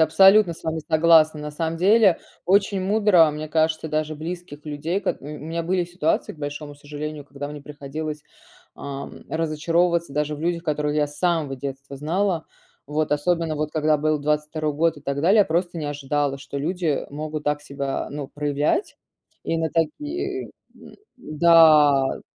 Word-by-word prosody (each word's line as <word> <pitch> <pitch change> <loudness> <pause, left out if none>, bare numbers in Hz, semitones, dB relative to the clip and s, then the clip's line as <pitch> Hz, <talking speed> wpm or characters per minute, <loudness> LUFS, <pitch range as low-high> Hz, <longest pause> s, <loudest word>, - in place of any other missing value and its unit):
Абсолютно 190 +3 +6
с - - -16
вами 160 0 -2
согласна. 160 -1 +5
На 150 0 -5
самом 160 +2 -3
деле, 195 +1 +5 0.3
очень 195 +1 +3
мудро, 190 -4 +4
мне 150 +1 -6
кажется, 160 0 +1
даже 155 0 -1
близких 165 -1 -7
людей 155 +5 -2
кот 195 - -2
м, 150 +2 -8
у - - -7
меня 165 +1 -2
были 180 +1 0
ситуации, 175 -2 -1
к - - -18
большому 145 0 -6
сожалению, 145 0 -7
когда 145 0 -7
мне 150 0 -8
приходилось, 150 +1 -6 0.5
ам, 140 0 -8
разочаровываться 165 +1 0
даже 150 0 -1
в 145 - -9
людях, 170 +1 -1
которых 150 -2 -1
я 150 -1 +2
с 145 0 -13
самого 165 -6 0
детства 140 +1 -7
знала. 165 +3 -1 0.4
Вот, 150 0 -1
особенно 165 +1 0
вот 150 0 -2
когда 155 -1 +2
был 155 0 +1
22 150 +1 -1
год 160 +2 +1
и - - -11
так 140 0 -2
далее, 200 +6 +5
просто 175 +1 -1
не 155 - -4
ожидала, 145 -1 -1
что 140 0 -8
люди, 175 +4 -2
э, 145 - 0
могут 150 +1 -5
так 145 0 0
себя 140 -1 -4
ну 145 -1 -5
проявлять. 145 - -1 0.5
И 165 - -1
на 160 0 0
такие, 300 - -2 0.3
м, - - -15 0.2
м-да. 155 - +5
155 Hz, 170 wpm, -23 LUFS, 145-170 Hz, 0.5 s, Абсолютно